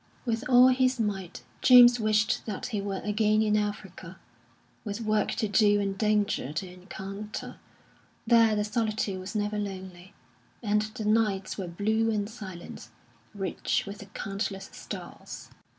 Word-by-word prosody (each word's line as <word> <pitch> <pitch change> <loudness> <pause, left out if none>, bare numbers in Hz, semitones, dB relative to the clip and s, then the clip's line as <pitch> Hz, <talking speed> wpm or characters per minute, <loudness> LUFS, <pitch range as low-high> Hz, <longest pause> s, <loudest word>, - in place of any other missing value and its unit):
With 230 0 -1
all 250 0 +8
his 255 -1 +2
might 195 -5 -3 0.2
James 245 -1 +8
wished 215 +1 +1
that 205 -3 -4
he 205 - 0
were 195 -1 -3
again 215 +1 +2
in 210 -1 +2
Africa, 195 -3 -4 0.7
with 205 0 -4
work 215 -1 +1
to 220 - -1
do 205 0 +4
and 195 -1 -1
danger 210 - 0
to 185 +5 -3
encounter. 195 +3 -8 0.7
There 230 -2 +5
the 210 - +1
solitude 215 -3 -1
was 185 +4 -7
never 210 0 -1
lonely, 190 -2 -7 0.5
and 210 -1 +2
the 215 +1 -5
nights 210 -3 +1
were 185 - -3
blue 220 +6 0
and 210 -2 -1
silent, 195 -6 -9 0.5
rich 195 -3 -1
with 200 0 -8
the 200 - -10
countless 195 0 -5
stars. - - -9
210 Hz, 145 wpm, -28 LUFS, 195-220 Hz, 0.7 s, all